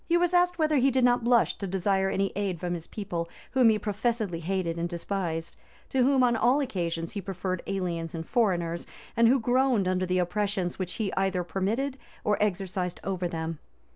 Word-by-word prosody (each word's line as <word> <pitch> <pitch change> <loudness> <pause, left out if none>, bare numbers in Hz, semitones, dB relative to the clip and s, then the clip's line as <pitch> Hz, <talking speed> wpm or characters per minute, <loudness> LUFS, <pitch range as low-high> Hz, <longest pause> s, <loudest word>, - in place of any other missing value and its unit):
He 340 - +5
was 350 0 +2
asked 355 0 +3
whether 310 -2 +2
he 265 +1 +4
did 260 -1 +2
not 245 -1 +4
blush 235 -1 +3
to 195 - -3
desire 190 +1 +1
any 195 0 0
aid 195 -4 -1
from 175 +1 -2
his 165 -2 -6
people, 175 -5 -4 0.2
whom 255 -3 +5
he 220 - +3
professedly 210 -3 -1
hated 170 -1 -2
and 170 +1 -1
despised; 170 -2 -3 0.3
to 265 - 0
whom 260 0 +4
on 240 -1 +4
all 245 +5 +3
occasions 170 - -2
he 205 - -4
preferred 185 -1 -3
aliens 170 -3 -2
and 165 0 -4
foreigners, 175 -8 0 0.3
and 230 0 +5
who 260 +3 +5
groaned 245 -3 +2
under 185 0 0
the 180 +1 +1
oppressions 190 0 -1
which 180 -1 -2
he 210 -4 -2
either 190 -2 0
permitted 220 +11 -2 0.2
or 210 0 +1
exercised 190 -3 -1
over 185 -2 -1
them. 165 -2 -4
195 Hz, 195 wpm, -28 LUFS, 175-235 Hz, 0.3 s, He